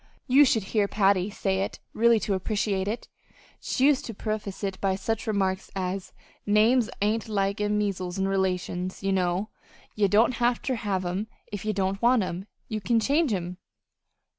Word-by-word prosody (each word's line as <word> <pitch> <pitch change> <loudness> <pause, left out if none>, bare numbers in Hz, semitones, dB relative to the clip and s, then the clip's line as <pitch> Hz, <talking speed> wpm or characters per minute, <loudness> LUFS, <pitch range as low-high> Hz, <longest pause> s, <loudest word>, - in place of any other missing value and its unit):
You 280 +3 +6
should 225 -5 +2
hear 210 -3 +3
Patty 195 -2 +2
say 195 -2 -1
it 195 - -2 0.2
really 230 0 +4
to 200 - -1
appreciate 195 0 -1
it. 225 +4 -3 0.5
She 260 - 0
used 290 -1 +4
to 230 - -6
preface 215 -2 -4
it 195 -1 -3
by 195 -1 +1
some 190 - -10
such 225 +2 -2
remark 190 -3 +1 0.2
as: 185 0 -3 0.3
'Names 220 +3 +3
ain't 220 +2 0
like 200 -1 0
measles 205 -3 -1
an' 190 0 +1
relations, 185 -1 -1
ye 195 - +1
know. 185 +2 0 0.4
Ye 210 -1 +2
don't 225 +5 +3
have 240 0 +3
ter 265 - -2
have 200 -6 -2
'em 185 +5 -2 0.2
if 205 0 -5
ye 215 - +1
don't 195 -1 -1
want 240 -2 +4
'em 185 +2 -5 0.2
you 215 -1 -3
can 230 +3 +2
change 285 +5 +2
'em.'" 180 -2 -3
205 Hz, 180 wpm, -26 LUFS, 190-225 Hz, 0.5 s, You